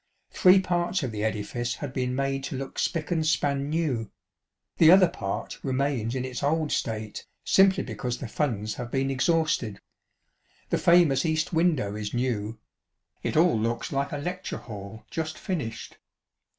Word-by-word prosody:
Three 185 +1 +6
parts 175 -1 0
of 125 - -2
the 105 -1 -3
edifice 110 +3 -2
had 140 -3 -6
been 125 -1 -1
made 135 0 -1
to - - -4
look 135 0 -6
spick 160 -1 -1
and 165 -2 +1
span 145 -2 +1
new 150 -8 0
ŌĆö - - -24 0.7
the 160 - +7
other 185 +1 +8
part 100 - -5
remains 130 -3 -1
in 130 0 -2
its 125 -2 -5
old 155 +1 +1
state, 110 -2 -3 0.2
simply 195 0 +5
because 120 +1 -4
the 130 - -6
funds 110 -5 -1
have 120 - -5
been 135 +1 0
ex 130 -1 0
hausted. 155 - +1 0.9
The - - +2
famous 170 -6 +5
east 160 +2 0
window 160 - +1
is 105 +1 -4
new; 115 -3 -1 0.6
it - - -1
all 165 -8 +4
looks 115 +1 -2
like 140 0 -1
a 145 - -3
lecture 180 +6 -4
hall 105 -2 -9
just 155 -1 -3
finished. 140 - -5
135 Hz, 165 wpm, -27 LUFS, 115-160 Hz, 0.9 s, other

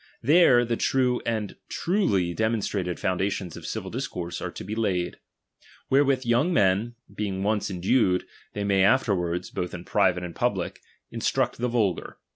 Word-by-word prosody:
There 130 -3 +6
the 115 0 -1
true 125 -2 +1
and 110 -3 -2
truly 130 - +1
demonstrated 105 -4 -1
foundations 95 -1 -1
of 80 -2 -8
civil 95 -4 -4
doctrine 90 -9 -4
are - - -3
to - - -8
be 105 - -5
laid; 95 -6 -1 0.7
wherewith 135 -1 +3
young 120 +9 +2
men, 105 - +2 0.2
being 95 -2 -3
once 105 0 0
en 90 -3 -5
dued, 95 -3 +3 0.3
they 105 - -3
may 100 -1 +3
afterward, 90 -6 +2
both 90 0 -3
in 85 0 -8
private 95 -3 +2
and 85 -1 -6
public, - - -1 0.3
instruct - - 0
the 125 - 0
vulgar. 110 -6 -1
105 Hz, 155 wpm, -26 LUFS, 90-120 Hz, 0.7 s, There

